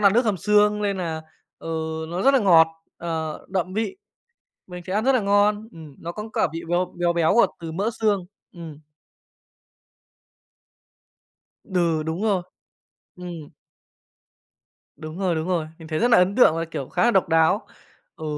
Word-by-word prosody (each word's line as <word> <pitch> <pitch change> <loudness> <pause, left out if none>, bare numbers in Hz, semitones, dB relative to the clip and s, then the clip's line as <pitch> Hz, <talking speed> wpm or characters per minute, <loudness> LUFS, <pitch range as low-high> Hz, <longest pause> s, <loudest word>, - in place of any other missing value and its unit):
nà 200 - +7
nước 240 +1 +4
hầm 210 -3 +1
xương 210 +3 +3
nên 200 -1 0
nà, 165 -3 -4 0.4
ừ, - - -9 0.4
nó 175 +2 -3
rất 275 +1 +5
là 270 - +4
ngọt, 170 -6 +6 0.3
ờ, 160 -2 -4
đậm 185 -1 -2
vị. 225 - -2 0.7
Mình 180 -1 -9
sẽ 185 - -4
ăn 210 +3 0
rất 270 - +4
là 255 - +3
ngon, 205 +1 +2
ừm, 155 -4 -12
nó 170 - -6
cắn 210 +4 -7
cả - - +1
vị 165 - -5
béo 175 +1 0
béo 175 0 +2
béo 170 +3 +2
ở 235 - +6
từ 165 -1 -6
mỡ 200 +7 -1
xương, 205 -4 +1 0.3
ừm. 165 -4 -9 2.9
Đừ, 170 -5 0
đúng 160 +5 -4
rồi, 200 -5 +1 0.7
ừm. 175 -4 -8 1.5
Đúng 155 +2 -8
rồi, 185 -3 0
đúng 160 +2 -3
rồi, 170 -4 0
mình 160 -2 -11
thấy 155 - -2
rất 240 - +2
nà 230 - +6
ấn 180 +2 +3
tượng 245 -10 +6
và, 165 - -1
kiểu, 140 -5 -6
khá - - -1
nà 240 - +5
độc 190 -6 +2
đáo. 165 +5 +3 0.5
Ừ, - - -8
180 Hz, 175 wpm, -23 LUFS, 165-210 Hz, 2.9 s, nà